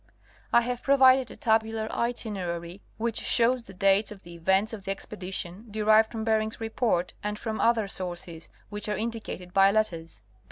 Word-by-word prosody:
I 235 - +6
have 245 +1 -3
provided 265 -2 +5
a - - -11
tabular 220 -1 +1
itinerary, 190 -7 -3 0.2
which 230 0 -1
shows 245 +1 +3
the 215 -4 -13
dates 195 +3 +3
of 200 -2 -11
the 170 - -11
events 190 +6 +1
of 205 -3 -7
the - - -5
expedition, 190 +1 -4
derived 215 +1 +3
from 225 -2 -4
Bering's 220 0 0
Report 225 -5 -1
and 210 0 -3
from 220 0 -4
other 230 -3 +3
sources, 175 -3 -6 0.2
which 210 0 -4
are 210 - -1
indicated 220 -5 -5
by 195 0 +6
letters. 190 -6 -2
215 Hz, 165 wpm, -27 LUFS, 190-225 Hz, 0.2 s, I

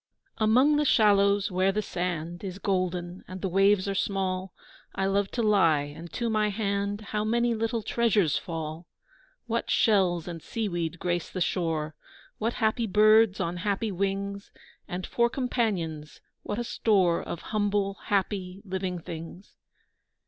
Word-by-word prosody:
AMONG 255 +7 +4
the 300 - +2
shallows 200 -4 +4
where 185 +1 +2
the 210 +2 -1
sand 175 -1 -3
Is 190 -1 -5
golden 185 -2 -2
and 185 0 -8
the - - +1
waves 195 +1 +3
are 200 - 0
small, 190 -1 -1 0.4
I 195 - 0
love 195 0 +1
to 235 - 0
lie, 170 -9 +4
and 170 +1 -10
to 235 - -1
my 215 -1 +1
hand 200 0 -1
How 210 0 -2
many 235 +2 +1
little 225 0 -1
treasures 210 - +2
fall! 165 -1 -5 0.6
What 230 0 -2
shells 185 -6 +3
and 170 -2 -6
seaweed 175 -7 -3
grace 175 0 -2
the 185 - -5
shore, 160 -4 -1 0.5
What 230 +2 0
happy 225 +1 0
birds 215 0 +5
on 170 +1 -2
happy 205 +3 -1
wings, 200 +1 -3 0.4
And 180 +1 -4
for 235 0 +1
companions, 195 - -2 0.2
what 205 - -4
a 240 - -1
store 190 -7 +2
Of 170 - -5
humble, 205 -1 0
happy, 195 -1 -1
living 185 -1 -3
things! 165 +3 -9
195 Hz, 150 wpm, -27 LUFS, 180-215 Hz, 0.6 s, birds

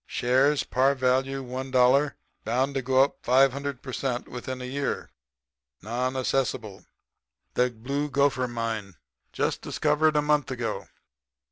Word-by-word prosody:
Shares 135 +4 +2
par 135 +2 +2
value 130 +1 +1
one 130 +1 -5
dollar. 130 +3 +3 0.3
Bound 130 +5 0
to 135 - -1
go 130 +1 +4
up 140 - -2
500 135 +1 +2
per 130 - -7
cent. 125 -2 -2
within 125 +1 -6
a 125 - -6
year. 135 +2 -3 0.7
Non 125 +4 -2
assessable. 130 -6 -2 0.7
The 125 0 +2
Blue 140 +6 -3
Gopher 135 -2 +2
mine. 115 -5 -4 0.4
Just - - -1
discovered 150 +1 +1
a 150 - +4
month 150 -2 +2
ago. 120 -4 -3
130 Hz, 135 wpm, -26 LUFS, 125-140 Hz, 0.7 s, go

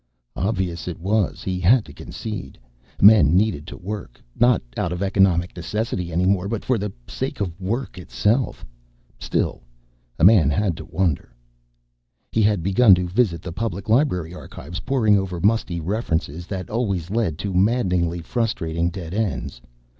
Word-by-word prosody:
Obvious 90 -5 -2
it 90 - -5
was, 100 +3 0
he 90 -1 -2
had 110 +6 +4
to 70 - -12
concede. 105 -2 -7 0.4
Men 100 -7 +7
needed 95 -7 0
to - - -8
work, 95 - -7 0.2
not 120 0 +4 0.2
out 85 - -1
of 90 +2 -2
economic 95 -3 +2
necessity 90 -1 -3
any 90 +3 +1
more 95 0 +2
but 110 0 -4
for 125 -4 +1
the 105 0 -3 0.2
sake 135 0 -4
of 95 -2 -4
work 110 +1 -3
itself. 105 - 0 0.5
Still - - -1 0.6
a - - -1
man 95 -6 +7
had 90 +4 +1
to - - -8
wonder.... 85 -9 -1 1.0
He 110 - +1
had 105 -5 +2
begun 95 +2 +6
to 90 0 -2
visit 90 -4 0
the 85 - -6
Public 100 -1 -4
Library 105 - +2
Archives, 90 -1 -8
poring 110 -3 +2
over 90 -2 -4
musty 100 -3 +1
references 85 -3 -2
that 95 -3 -5
always 100 -7 -1
led 105 -9 0
to 95 +1 -4
maddeningly 90 -4 +1
frustrating 85 -5 -1
dead 90 -1 -7
ends. 80 - -2
95 Hz, 155 wpm, -22 LUFS, 85-110 Hz, 1.0 s, Men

